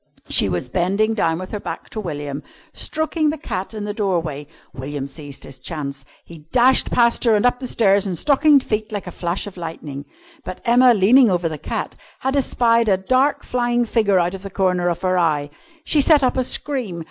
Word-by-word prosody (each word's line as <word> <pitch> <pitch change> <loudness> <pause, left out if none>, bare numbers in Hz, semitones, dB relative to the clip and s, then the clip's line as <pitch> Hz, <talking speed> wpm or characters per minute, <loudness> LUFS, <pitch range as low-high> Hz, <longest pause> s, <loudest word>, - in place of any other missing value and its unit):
She 100 - +4
was 90 -1 -2
bending 200 +5 0
down 165 -7 0
with 185 +1 -7
her 210 - -4
back - - -7
to 220 - -5
William, 145 -6 -5 0.3
stroking 315 0 -1
the 310 - -3
cat 195 - -5
in 210 - -5
the 205 0 -4
doorway. 170 -9 -2 0.3
William 135 +2 -5
seized 140 0 -10
his 135 -1 -10
chance. 140 -1 -6 0.2
He 160 -2 -14
dashed 255 +1 +4
past 235 -1 +2
her 230 -3 +4
and 210 - +1
up 245 0 +2
the 255 - -5
stairs 200 -4 +2
in 185 - -2
stockinged 285 - +4
feet 215 0 -3
like 205 -2 -4
a 180 - -7
flash 175 +2 -3
of 200 -2 -10
lightning. 150 -4 -7 0.4
But 185 - -7
Emma, 245 +1 +5
leaning 225 +5 +5
over 175 -2 0
the 155 -2 -5
cat, - - -4 0.3
had 265 +1 -1
espied 235 -4 +2
a 190 - +3
dark 255 +9 +1
flying 240 -1 0
figure 215 -4 +2
out 175 0 +1
of 190 - -7
the 195 - -7
corner 180 -2 0
of 170 - -4
her 185 -1 +2
eye. 150 -4 0 0.3
She 300 - +3
set 295 -1 +4
up 255 - +2
a 255 - +1
scream. 245 -9 -2
195 Hz, 205 wpm, -20 LUFS, 165-240 Hz, 0.4 s, Emma